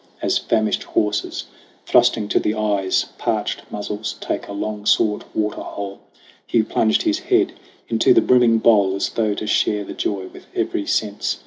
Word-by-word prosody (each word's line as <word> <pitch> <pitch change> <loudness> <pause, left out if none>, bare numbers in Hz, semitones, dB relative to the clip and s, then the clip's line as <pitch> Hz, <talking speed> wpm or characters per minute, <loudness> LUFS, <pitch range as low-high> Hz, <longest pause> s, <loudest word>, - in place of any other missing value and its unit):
As - - +1
famished 110 -1 0
horses, 105 0 -1 0.4
thrusting 105 -2 +3
to - - +3
the 105 - -1
eyes 100 -3 +1
Parched - - -1
muzzles, 105 +1 -4
take - - -3
a - - -8
long 105 +1 -4
sought 105 0 +2
water 105 -1 -1
hole, 100 -1 -6 0.5
Hugh 115 - +2
plunged 110 0 +1
his 320 0 +1
head 370 -1 +1 0.3
into 390 - +3
the 355 - +7
brimming 125 - +4
bowl 100 -4 +4
As 100 - -1
though 110 -2 0
to 110 - -4
share 105 -1 +1
the - - -7
joy 95 -2 -2
with - - -14
every 100 - -1
sense. 105 -1 -1
105 Hz, 165 wpm, -21 LUFS, 100-110 Hz, 0.5 s, the